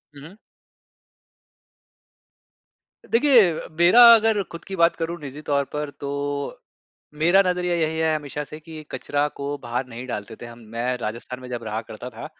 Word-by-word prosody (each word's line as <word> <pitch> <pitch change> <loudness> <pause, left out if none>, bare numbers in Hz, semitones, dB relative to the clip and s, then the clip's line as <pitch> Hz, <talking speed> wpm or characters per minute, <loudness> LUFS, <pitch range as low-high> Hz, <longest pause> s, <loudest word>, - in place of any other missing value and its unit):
हुँ, 140 - -12
हुँ। 185 +7 -13 2.7
देखिए 235 -5 +6
अ, - - -8
मेरा 180 +8 +7
अगर 220 -2 +2
खुद 170 - -9
की 195 - -6
बात 170 -1 +3
करूँ 170 +1 -3
निजी 145 +1 -8
तौर 140 -1 +2
पर, 150 -1 -3
तो 140 0 -4 0.6
मेरा 175 +4 +6
नज़रिया 180 -1 0
यही 160 -1 0
है 160 -1 +2
हमेशा 150 0 -5
से 155 +2 -10
कि 155 0 -10
कचरा 145 0 -1
को 140 +1 -3
बाहर 120 +2 -2
नहीं 120 +1 -8
डालते 110 -1 -5
थे 120 - -6
हम। 120 0 -11 0.2
मैं 125 +2 -1
राजस्थान 120 +2 -6
में 125 - -10
जब 120 -1 -5
रहा 110 0 -3
करता 115 +3 -9
था 115 -1 -9
145 Hz, 170 wpm, -23 LUFS, 125-170 Hz, 2.7 s, मेरा